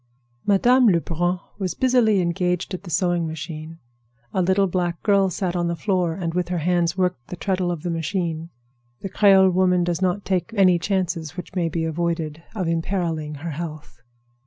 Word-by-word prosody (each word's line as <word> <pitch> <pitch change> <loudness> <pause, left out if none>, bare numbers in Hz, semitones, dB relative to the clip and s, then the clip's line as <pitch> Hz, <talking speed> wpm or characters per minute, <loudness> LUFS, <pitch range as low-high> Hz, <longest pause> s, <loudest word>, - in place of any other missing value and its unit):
Madame 245 +5 +5
Lebrun 175 -1 +1 0.2
was 185 -3 -2
busily 240 -6 +3
engaged 180 +2 -1
at 185 - -4
the 185 - -10
sewing 175 0 +1
machine. 160 +1 -7 0.6
A 190 - +1
little 190 +2 +3
black 175 -2 -2
girl 200 -2 +3
sat 180 -1 -2
on 175 -1 0
the 170 - -1
floor, 175 -1 0
and 165 -3 -3
with 180 0 -1
her 180 - -1
hands 170 +1 +1
worked 180 -10 -1
the - - -6
treadle 185 -1 -1
of 170 -3 -4
the 175 - -2
machine. 165 -1 -2 0.5
The 195 - -4
Creole 190 -1 +5
woman 180 -1 +3
does 175 +1 -1
not 185 +2 0
take 190 +3 -1
any 185 -4 +5
chances 175 -3 -2
which 180 - -7
may 175 -3 0
be 165 0 -2
avoided 160 -1 -2
of 185 -5 -2
imperiling 165 -2 -2
her 170 - -2
health. 155 -5 -7
175 Hz, 180 wpm, -23 LUFS, 165-190 Hz, 0.6 s, Madame